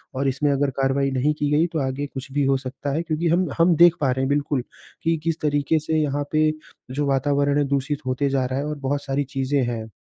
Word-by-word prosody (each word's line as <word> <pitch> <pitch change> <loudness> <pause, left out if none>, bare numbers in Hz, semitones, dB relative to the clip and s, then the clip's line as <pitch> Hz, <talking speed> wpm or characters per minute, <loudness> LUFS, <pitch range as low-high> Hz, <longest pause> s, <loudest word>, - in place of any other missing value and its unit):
और 135 +1 0
इसमें 135 +2 +1
अगर 140 0 +1
कार्रवाई 135 +1 +1
नहीं 135 +3 +1
की 145 - +1
गई, 155 +3 +3
तो 165 -2 -3
आगे 140 +2 -3
कुछ 135 0 -8
भी 145 +1 +1
हो 135 0 +3
सकता 135 +2 -5
है 160 - 0
क्योंकि 160 +1 -1
हम 175 +2 +2
हम 170 +1 +4
देख 170 +1 +7
पा 135 -3 +2
रहे 130 +1 -1
हैं, 135 - 0
बिल्कुल, 145 -2 0 0.4
कि 165 0 +2
किस 165 -1 -1
तरीके 145 +1 +1
से 155 +1 -1
यहाँ 145 -1 -1
पे 155 0 +3 0.4
जो 145 +3 -1
वातावरण 140 +1 +1
है 145 - +3
दूषित 140 0 -2
होते 135 +2 0
जा 135 -1 +1
रहा 130 +1 -2
है 145 - -2
और 150 0 -4
बहुत 145 +1 -1
सारी 140 +1 0
चीज़ें 135 0 +1
हैं। 115 -2 -4
145 Hz, 245 wpm, -23 LUFS, 135-150 Hz, 0.4 s, देख